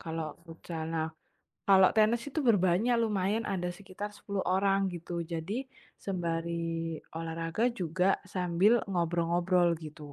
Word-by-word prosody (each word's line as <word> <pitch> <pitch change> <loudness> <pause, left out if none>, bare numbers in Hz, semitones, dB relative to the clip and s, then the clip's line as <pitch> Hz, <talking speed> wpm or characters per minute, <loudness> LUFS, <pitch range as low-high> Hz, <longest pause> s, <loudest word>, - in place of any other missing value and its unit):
kalau 160 -2 -4
futsal, 165 -1 -6
nah. 160 -1 0 0.6
Kalau 190 -1 +8
tenis 220 +2 +4
itu 310 +3 -2
berbanyak 205 +2 +3
lumayan 210 +1 0
ada 180 -2 -1
sekitar 200 +3 -7
10 200 -2 -3
orang 195 +1 +2
gitu. 170 0 -4
Jadi 175 +10 -3 0.3
sembari 165 -2 -2 0.2
olahraga 165 +8 -1
juga 180 +3 +1
sambil 185 +6 +3
ngobrol-ngobrol 175 0 +2
gitu 150 -2 -9
175 Hz, 120 wpm, -30 LUFS, 165-195 Hz, 0.6 s, Kalau